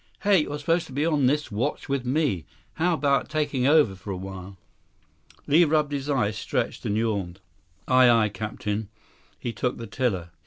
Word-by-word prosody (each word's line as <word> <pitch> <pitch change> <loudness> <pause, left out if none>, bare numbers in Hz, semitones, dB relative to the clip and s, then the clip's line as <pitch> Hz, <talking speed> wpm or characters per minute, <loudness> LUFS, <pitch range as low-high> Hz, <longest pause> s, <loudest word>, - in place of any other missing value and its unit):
"Hey, 200 -2 +4
you're 150 -1 -2
supposed 165 +3 0
to 135 - -11
be 145 +3 0
on 150 -5 +2
this 150 -1 0
watch 120 +9 -2
with 140 -2 -1
me. 125 - 0 0.3
How 170 +1 +1
'bout 140 -2 +1
taking 145 -4 0
over 145 -9 +5
for 95 +2 -11
a 95 - -3
while?" 95 0 -8 0.9
Li 155 +4 +5
rubbed 150 -2 +2
his 140 0 -3
eyes, 125 -7 +1
stretched, - - -2
and 105 - 0
yawned. 100 -5 -2 0.5
100 130 0 +3
"Aye, 125 -1 +7
aye, 105 - +1
Captain." 105 0 -4 0.5
He 120 - -5
took 125 +1 -2
the 115 - -6
tiller. 95 -5 -2
130 Hz, 185 wpm, -25 LUFS, 105-150 Hz, 0.9 s, Aye